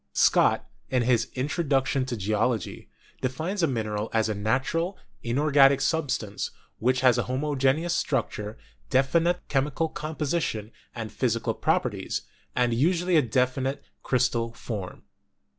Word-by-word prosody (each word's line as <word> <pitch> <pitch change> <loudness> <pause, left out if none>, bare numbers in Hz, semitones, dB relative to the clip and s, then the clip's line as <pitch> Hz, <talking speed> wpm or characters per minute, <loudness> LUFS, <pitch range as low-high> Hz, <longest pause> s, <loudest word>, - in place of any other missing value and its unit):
Scott, - - +3 0.2
in 125 -2 +2
his 120 -1 +2
'Introduction 135 -1 0
to 120 -2 -3
Geology/ 105 +2 -1 0.3
defines 160 +10 -2
a 165 - +4
mineral 110 -4 -2
as 110 -1 +2
a - - +1
natural, 135 - -1 0.2
inorganic 140 +2 +4
substance, 130 -10 -1 0.3
which 130 +2 +2
has 125 -2 +5
a - - +1
homogeneous 140 +4 +1
structure, 105 -9 -2 0.3
definite 165 +7 +2
chemical 150 +4 0
composition 150 -9 -2 0.2
and 110 -2 -5
physical 115 -3 0
properties, - - -1 0.3
and 120 -1 +2
usually 175 +7 +2
a 155 - +7
definite 130 +2 0 0.2
crystal 120 -2 +1
form. 105 -5 -6
130 Hz, 120 wpm, -26 LUFS, 115-150 Hz, 0.3 s, a